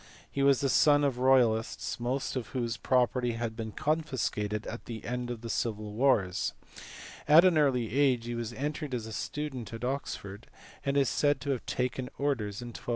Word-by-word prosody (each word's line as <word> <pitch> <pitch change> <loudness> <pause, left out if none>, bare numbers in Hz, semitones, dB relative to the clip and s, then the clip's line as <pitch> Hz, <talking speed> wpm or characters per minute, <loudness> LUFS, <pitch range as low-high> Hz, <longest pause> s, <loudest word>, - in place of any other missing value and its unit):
He 140 - -2
was 140 -1 +4
the 140 - +2
son 145 +2 +5
of 135 -3 0
royal 130 -3 +5
ists, 110 +2 -5
most 130 +4 -2
of 125 -3 -3
whose 120 -2 -1
property 125 0 +1
had 115 -1 -3
been 110 -1 -5
confiscated 130 -9 -1
at 120 - -7
the 115 -2 -7
end 125 0 -3
of 120 -2 -5
the 115 - -6
civil 105 -2 -2
wars: 105 -7 +2 0.7
at 155 +4 +8
an 180 -2 +5
early 125 -7 +2
age 130 -4 +3
he 120 - -3
was 115 -1 -3
entered 145 +1 -3
as 115 -3 -4
a 110 - -7
student 140 -4 -4
at 115 +1 -7
Oxford, 115 -6 -4 0.4
and 140 0 0
is 140 -2 +4
said 145 +2 +2
to 140 +2 -1
have 130 - -3
taken 125 0 -2
orders 120 -7 -1
in 120 - -7
1233. 120 - -9
125 Hz, 195 wpm, -30 LUFS, 115-140 Hz, 0.7 s, at